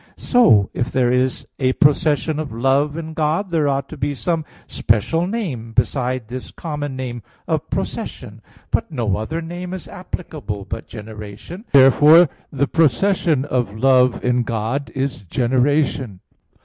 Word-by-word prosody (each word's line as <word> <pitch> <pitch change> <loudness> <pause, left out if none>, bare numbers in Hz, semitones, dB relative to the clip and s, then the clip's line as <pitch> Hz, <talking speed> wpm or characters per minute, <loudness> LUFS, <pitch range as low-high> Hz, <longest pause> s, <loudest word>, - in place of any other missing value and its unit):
So 210 - +4
if 120 - -2
there 125 -2 +2
is 125 +1 0
a 130 -1 +2
procession 150 +1 +2
of 155 -3 -4
love 135 +6 +1
in 160 -1 -6
God, 160 +5 -1
there 155 -3 +2
ought 135 0 0
to 160 - -8
be 145 +1 -2
some 165 +2 -1 0.2
special 160 - 0
name 150 - -4
besides 125 -1 0
this 125 +2 -7
common 145 -4 -5
name 125 -2 -5 0.3
of - - -1
procession. - - -5 0.3
But - - 0
no 115 - -1
other 160 +10 -4
name 175 +2 -6
is 185 - -9
applicable 155 - -6
but - - -6
generation. 110 - -9
Therefore 145 +5 +7 0.2
the 140 0 0
procession 160 - +2
of 120 -7 -2
love 130 -1 +3
in 125 0 +2
God 115 +4 -2
is 135 -5 -2
generation. 130 - 0
135 Hz, 145 wpm, -20 LUFS, 120-160 Hz, 0.3 s, Therefore